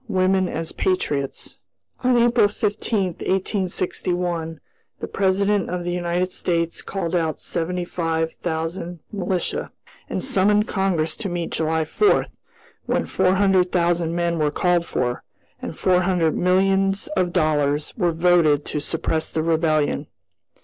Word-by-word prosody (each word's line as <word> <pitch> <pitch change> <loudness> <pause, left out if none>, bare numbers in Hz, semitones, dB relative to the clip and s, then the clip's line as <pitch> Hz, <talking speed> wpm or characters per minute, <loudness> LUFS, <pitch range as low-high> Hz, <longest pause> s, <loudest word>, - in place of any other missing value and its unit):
WOMEN 185 -2 +2
AS 160 0 -4
PATRIOTS. 145 -7 -2 0.4
On 250 -1 +4
April 235 -2 +4
15, 205 -3 -1
1861, 180 -3 -2 0.4
the - - -3
President 200 +1 +1
of 180 0 -3
the 175 - -2
United 175 +1 -1
States 170 -2 -1
called 185 -3 -3
out 160 -3 0
seventy 175 +1 -2
five 165 -2 -1
thousand 170 +1 -4
militia, 185 -2 -2 0.4
and - - -2
summoned 210 -4 +3
Congress 185 -5 0
to 210 -4 -4
meet 175 -1 -3
July 160 0 0
4, 415 - +3 0.6
when - - 0
four 185 +1 +2
hundred 190 -2 +3
thousand 170 -1 +1
men 170 -1 0
were 150 -1 +2
called 175 +2 +1
for, 120 -1 -1 0.4
and - - -6
four 180 -1 +3
hundred 175 -4 +1
millions 195 +2 +2
of 185 -12 0
dollars 150 -3 +1
were 175 -6 +1
voted 165 -3 +3
to 150 - -2
suppress 160 +1 -1
the 160 - -1
Rebellion. 160 -2 +1
175 Hz, 135 wpm, -22 LUFS, 160-190 Hz, 0.6 s, On